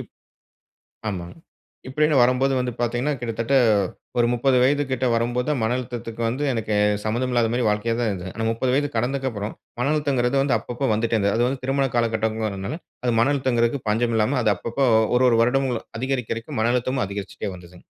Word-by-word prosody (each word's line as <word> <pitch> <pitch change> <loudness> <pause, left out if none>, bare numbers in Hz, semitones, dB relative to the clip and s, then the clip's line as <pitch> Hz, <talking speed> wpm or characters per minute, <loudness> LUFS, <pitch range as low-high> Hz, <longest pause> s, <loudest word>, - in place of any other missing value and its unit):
இப் - - -10 1.0
ஆமாங்க. 90 - -5 0.5
இப்படீன்னு 150 +2 +2
வரும்போது 130 +2 +3
வந்து 125 -1 -2
பார்த்தீங்கன்னா, 120 +5 0
கிட்டத்தட்ட 115 +3 -2 0.6
ஒரு 120 - +4
30 125 +2 +2
வயது 145 +3 +3
கிட்ட 130 0 0
வரும்போது 120 +2 0
தான் 145 -5 0
மன 110 +3 +1
அழுத்தத்துக்கு 120 -2 -6
வந்து, 130 +5 -2
எனக்கு 110 -2 -2 0.3
சம்மந்தம் 120 +4 -1
இல்லாத 120 -2 +2
மாதிரி 120 -2 +1
வாழ்க்கையா 105 +2 0
தான் 115 -3 +1
இருந்தது. 95 -1 -5
ஆனா 115 0 -1
30 125 +3 0
வயது 145 0 +1
கடந்ததுக்கு 130 +3 0
அப்பறம், 105 -1 -5 0.3
மன 140 +4 +1
அழுத்தம்ங்கிறது 135 -3 +1
வந்து 140 -3 +2
அப்பப்போ 125 +3 -3
வந்துட்டே 115 +1 0
இருந்தது. 100 -1 +1
அது 120 +1 +2
வந்து 135 -1 -4
திருமண 135 +1 +1
காலகட்டங்கிறதுனால, 110 - -1 0.3
அது 120 - +2
மன 135 +5 +3
அழுத்தம்ங்கிறதுக்கு 120 -2 0
பஞ்சம் 115 +2 +1
இல்லாம, 120 +6 +1
அது 105 -2 +3
அப்பப்ப 115 +8 -5 0.4
1- 130 - +3
1 115 - +3
வருடங்களும் 125 -1 0
அதிகரிக்கதிகரிக்க 125 -4 -3
மன 120 +2 +2
அழுத்தமும் 125 0 0
அதிகரிச்சுட்டே 100 0 -5
வந்ததுங்க. 90 0 -15
120 Hz, 175 wpm, -23 LUFS, 110-130 Hz, 1.0 s, ஒரு